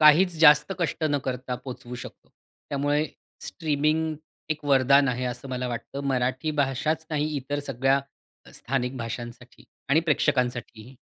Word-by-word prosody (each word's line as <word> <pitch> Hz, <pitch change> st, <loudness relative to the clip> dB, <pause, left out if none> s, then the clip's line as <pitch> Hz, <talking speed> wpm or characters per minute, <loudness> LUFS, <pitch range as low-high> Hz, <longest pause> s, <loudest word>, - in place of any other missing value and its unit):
काहीच 165 Hz, +4 st, +6 dB
जास्त 150 Hz, +1 st, +7 dB
कष्ट 170 Hz, -2 st, -1 dB
न 145 Hz, -, +2 dB
करता 125 Hz, 0 st, -3 dB
पोहचवू 125 Hz, 0 st, -8 dB
शकतो. 125 Hz, -, -10 dB, 0.4 s
त्यामुळे 145 Hz, +2 st, +1 dB, 0.4 s
स्ट्रीमिंग, 155 Hz, 0 st, 0 dB, 0.4 s
एक 155 Hz, -1 st, -2 dB
वरदान 140 Hz, 0 st, +5 dB
आहे 125 Hz, 0 st, -1 dB
असं 125 Hz, +2 st, -4 dB
मला 125 Hz, -1 st, -2 dB
वाटतं 125 Hz, +3 st, -5 dB
मराठी 130 Hz, +3 st, 0 dB
भाषाच 150 Hz, +4 st, 0 dB
नाही 150 Hz, 0 st, 0 dB
इतर 140 Hz, +1 st, -3 dB
सगळ्या, 135 Hz, +2 st, +2 dB, 0.5 s
स्थानिक 130 Hz, 0 st, -2 dB
भाषांसाठी 120 Hz, -1 st, -7 dB, 0.2 s
आणि 145 Hz, +4 st, +5 dB
प्रेक्षकांसाठीही. 125 Hz, -5 st, 0 dB
135 Hz, 130 wpm, -26 LUFS, 125-150 Hz, 0.5 s, जास्त